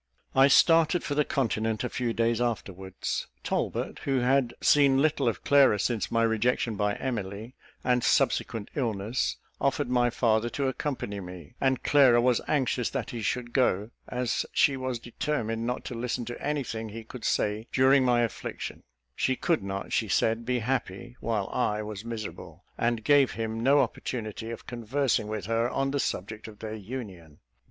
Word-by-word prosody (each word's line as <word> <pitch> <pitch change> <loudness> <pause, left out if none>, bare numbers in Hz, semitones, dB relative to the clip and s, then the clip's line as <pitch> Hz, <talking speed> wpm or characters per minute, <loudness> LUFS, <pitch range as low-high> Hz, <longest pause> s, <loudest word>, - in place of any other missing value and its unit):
I 135 +1 +6
started 165 +3 +5
for 145 - -2
the 150 +1 +3
continent 110 -5 -1
a - - 0
few 125 -1 -2
days 115 0 +1
afterwards. 95 -5 -3 0.2
Talbot, - - -2
who 135 -1 0
had 125 -1 +2
seen 140 -2 +5
little 145 -3 +2
of 110 -5 -1
Clara 140 -7 +5
since 115 +1 -1
my 115 0 +2
rejection 115 0 +1
by 105 0 0
Emily, 110 -2 -4 0.3
and 125 -1 +2
subsequent 110 -3 +1
illness, 115 -3 -1 0.2
offered 140 -1 0
my 120 -1 +3
father 115 -1 +1
to 140 -1 +1
accompany 130 -6 -3
me; 90 -4 -10
and 130 -1 +1
Clara 130 -5 +6
was 120 0 +3
anxious 130 -4 +1
that - - -4
he 120 - -5
should 120 +3 -2
go, 110 -4 +1 0.2
as 125 -1 -1
she 140 - +4
was 130 -2 -3
determined 115 -2 -3
not 125 +1 -3
to - - -5
listen 120 +1 -3
to 120 +1 -7
any 145 0 0
thing 110 -2 -5
he 115 +2 -8
could 115 +2 -10
say 105 +2 0
during 130 +1 +5
my 120 -1 +3
affliction; 115 - -4 0.3
she 130 - +1
could 165 +4 +1
not, 100 0 -5
she - - +1
said, 115 +1 +1
be 125 0 +1
happy 120 -1 -3
while 110 -4 -1
I 105 -3 0
was 105 -1 -6
miserable, 115 -2 -7
and 115 -1 0
gave 140 0 +4
him 115 0 -3
no 140 +4 +5
opportunity 110 -2 -4
of 115 - -7
conversing 120 -1 -1
with 105 -3 -4
her 115 +2 +1
on 135 +1 -1
the 140 - -1
subject 110 -1 -3
of 105 -1 -11
their 110 0 -6
union. 100 - -8
120 Hz, 175 wpm, -28 LUFS, 110-130 Hz, 0.3 s, I